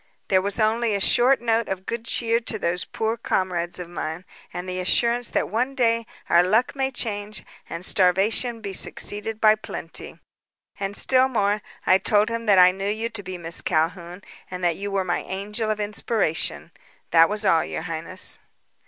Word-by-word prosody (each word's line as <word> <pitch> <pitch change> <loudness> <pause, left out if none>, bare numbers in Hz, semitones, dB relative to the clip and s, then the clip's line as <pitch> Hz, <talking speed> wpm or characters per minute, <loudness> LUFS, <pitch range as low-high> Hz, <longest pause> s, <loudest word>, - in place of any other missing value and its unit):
There 190 -1 +4
was 200 +3 -3
also 220 +2 +2
a 215 -4 0
short 245 +6 +4
note 230 -1 +1
of 190 -1 -4
good 235 0 -5
cheer 230 0 +2
to 225 -1 -3
those 180 -2 -1
poor 225 +1 -2
comrades 175 -5 -2
of 180 -2 -6
mine, 175 0 -6 0.3
and 180 +1 -6
the 185 0 -4
assurance 235 +6 +1
that - - -1
one 250 +5 -2
day 230 -3 +1 0.2
our 170 - +5
luck 215 +9 +1
may 265 -1 0
change 210 -5 -4 0.2
and 170 +2 -4
starvation 210 +6 +1
be 200 -2 -6
succeeded 210 +3 -1
by 215 -1 +6
plenty. 215 - -7 0.6
And, 200 0 -1
still 260 0 +6
more, 210 -4 0 0.2
I 185 - +5
told 210 +2 +2
him 230 0 -4
that 200 -2 +5
I 180 0 +7
knew 195 +2 -4
you 220 +2 -2
to 225 -3 -5
be 185 -1 -7
Miss 170 0 +1
Calhoun 175 +3 -2 0.3
and 180 0 -7
that 170 -2 +2
you 200 +3 -5
were 195 -1 -1
my 175 -1 0
angel 210 +3 -4
of 215 0 -1
inspiration. 210 -4 -2 0.4
That 165 0 +6
was 210 +1 -2
all, 165 -4 +4
your - - -5
highness." 165 +2 0
205 Hz, 185 wpm, -23 LUFS, 185-225 Hz, 0.6 s, I